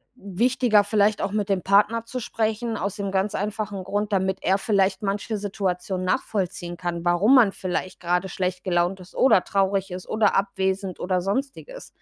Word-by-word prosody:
wichtiger, 225 +1 +2
vielleicht 205 0 +2
auch 200 - -1
mit 205 -1 -1
dem 190 -2 0
Partner 210 +4 +3
zu 255 +2 -5
sprechen, 225 0 -2
aus 200 +1 -3
dem 200 -1 -3
ganz 195 +1 0
einfachen 205 -1 -3
Grund, 205 +2 -2
damit 190 0 +1
er 195 +1 +2
vielleicht 195 -2 +1
manche 205 +2 -2
Situation 190 -2 -3
nachvollziehen 180 -2 -2
kann, 170 -1 -4
warum 175 +8 +3
man 230 -6 +6
vielleicht 185 -1 -4
gerade 180 +2 0
schlecht 180 0 -3
gelaunt 180 0 0
ist 180 0 -14
oder 255 -8 +4
traurig 195 0 0
ist 180 0 -7
oder 215 -2 +2
abwesend 190 -1 -1
oder 185 0 0
sonstiges. 270 - -4
195 Hz, 170 wpm, -24 LUFS, 185-210 Hz, -, man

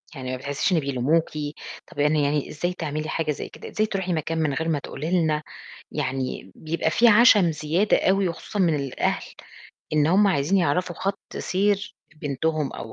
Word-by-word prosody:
يعني 130 -1 -5
ما 130 - -2
بتحسيش 140 +7 -1
إن 165 - +4
بيلوموكِ، 140 +4 +1 0.6
طب 145 - -10
يعني 150 0 +3
يعني 145 0 0
إزاي 175 +4 -2
تعملي 155 -2 -4
حاجة 160 -2 -1
زي 145 - -5
كده، - - -10
إزاي 215 - +1
تروحي 190 -3 -2
مكان 160 +1 -2
من 150 -3 +1
غير 160 +3 -2
ما 150 -3 +1
تقولي 150 +4 -5
لنا، 155 -1 0 0.5
يعني 130 -8 -3
بيبقى 160 0 -1
في 235 +6 +5
عَشَم 210 -6 +6
زيادة 160 +7 +1
أوي، 195 -1 +2
وخصوصًا 205 +5 -6
من 170 -5 +3
الأهل 140 -3 -2 0.6
إن 150 -1 +3
هُم 195 +5 +4
عايزين 170 +4 +2
يعرفوا 175 +2 0
خَط 195 +1 -2 0.2
سير 200 +2 0 0.3
بنتهم 150 0 -1
أو 110 - -8
155 Hz, 175 wpm, -24 LUFS, 145-180 Hz, 0.6 s, عَشَم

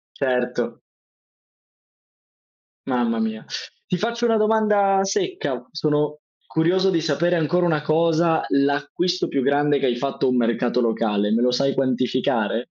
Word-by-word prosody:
Certo. 125 -2 -1 2.1
Mamma 120 -3 0
mia. 110 0 -3 0.4
Ti 180 - -1
faccio 235 +4 -2
una 225 -1 +3
domanda 210 -2 +3
secca. 195 - -2
Sono 150 -1 -1 0.3
curioso 185 +4 +1
di 170 -3 +1
sapere 170 +3 +1
ancora 175 +2 +1
una 155 -3 +1
cosa: 160 +1 +2
l'acquisto 145 +6 0
più 135 - 0
grande 145 +1 +2
che 135 - 0
hai 120 -2 +1
fatto 135 +3 -2
a - - +3
un 125 - +1
mercato 120 +1 +1
locale. 105 -3 0
Me 115 +2 +2
lo 125 0 +3
sai 135 +2 +1
quantificare? 125 -4 0
145 Hz, 135 wpm, -22 LUFS, 125-175 Hz, 2.1 s, una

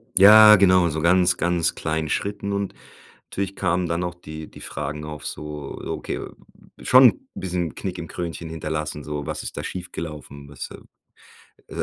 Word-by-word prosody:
Ja, 105 +2 +9
genau, 95 -3 +4
so 80 0 -3
ganz, 90 +1 +4
ganz 85 -1 0
kleinen 80 -1 -2
Schritten 100 0 -2
und 100 0 -2 0.5
natürlich 100 0 -4
kamen 90 -1 0
dann 85 +1 -1
auch 90 0 -4
die 80 -2 -9
die - - -14
Fragen 75 +1 -5
auf 75 -1 -8
so, 75 -2 -6
okay, - - -4 0.6
schon - - +7
'n - - -21
bisschen 90 -3 -3
Knick 95 -2 -5
im 85 - -6
Krönchen 85 -2 -6
hinterlassen, 75 -2 -4
so: 75 0 -5
„Was 75 -1 -4
ist - - -7
da - - -4
schiefgelaufen?“ 75 -5 -7
Was 70 - -7
äh, - - -8 0.7
äh, - - -10
85 Hz, 165 wpm, -23 LUFS, 75-90 Hz, 0.7 s, Ja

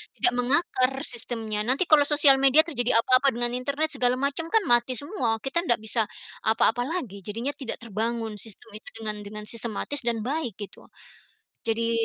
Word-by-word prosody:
tidak 365 - +4
mengakar 255 0 +1
sistemnya. 225 -3 -2
Nanti 270 +8 +2
kalau 300 -2 +7
sosial 290 -2 +6
media 275 +3 +7
terjadi 245 -8 0
apa-apa 255 +3 +3
dengan 240 0 +1
internet, 285 +5 -2
segala 250 -1 +2
macam, 280 +4 -1
kan 445 -2 +3
mati 240 +1 +3
semua, 270 - -1
kita 305 +6 0
ndak 235 - +2
bisa 220 0 0 0.4
apa-apa 225 +2 +2
lagi. 255 - -4
Jadinya 230 +8 -3
tidak 265 -5 -5
terbangun 225 0 -3
sistem 220 0 -6
itu - - -19
dengan 215 -1 -3
dengan 210 +1 -7
sistematis 235 +5 -2
dan 230 -2 0
baik, 270 -7 -2
gitu. 205 - -9 0.7
Jadi 230 0 -1
245 Hz, 165 wpm, -26 LUFS, 225-280 Hz, 0.7 s, kalau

